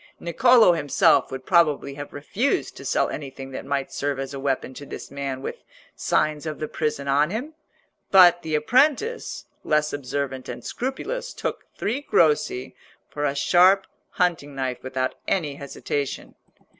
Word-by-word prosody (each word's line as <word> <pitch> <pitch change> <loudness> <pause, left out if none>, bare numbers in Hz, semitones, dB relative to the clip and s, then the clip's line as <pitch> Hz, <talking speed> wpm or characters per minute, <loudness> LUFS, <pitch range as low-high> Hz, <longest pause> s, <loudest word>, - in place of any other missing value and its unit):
Niccolò 225 +1 +5
himself 145 -3 +3
would 130 0 -6
probably 155 -5 +3
have 145 +1 -8
refused 230 - -1
to - - -10
sell - - +1
anything 135 -2 -7
that 130 - -7
might 140 -1 -2
serve 140 -1 -1
as 135 +1 -5
a 135 - -5
weapon 135 -1 -2
to 145 - -9
this - - -9
man 135 -1 -4
with - - -6 0.3
signs 155 0 0
of 155 -2 -4
the 155 - -4
prison 150 -3 -2
on 145 +3 +3
him; 245 - -4 0.6
but 175 -2 +7
the 160 -1 -2
apprentice, 280 - +1 0.2
less 150 0 +1
observant 135 -1 -4
and - - -7
scrupulous, 465 - -4
took - - -4
three 245 +7 -1
grossi 150 - +1 0.4
for 145 0 -2
a 140 -1 0
sharp 185 +6 +5 0.3
hunting 165 -6 0
knife 130 -2 -3
without 130 0 -2
any 155 -7 0
hesitation. 140 0 -4
150 Hz, 155 wpm, -24 LUFS, 140-180 Hz, 0.6 s, but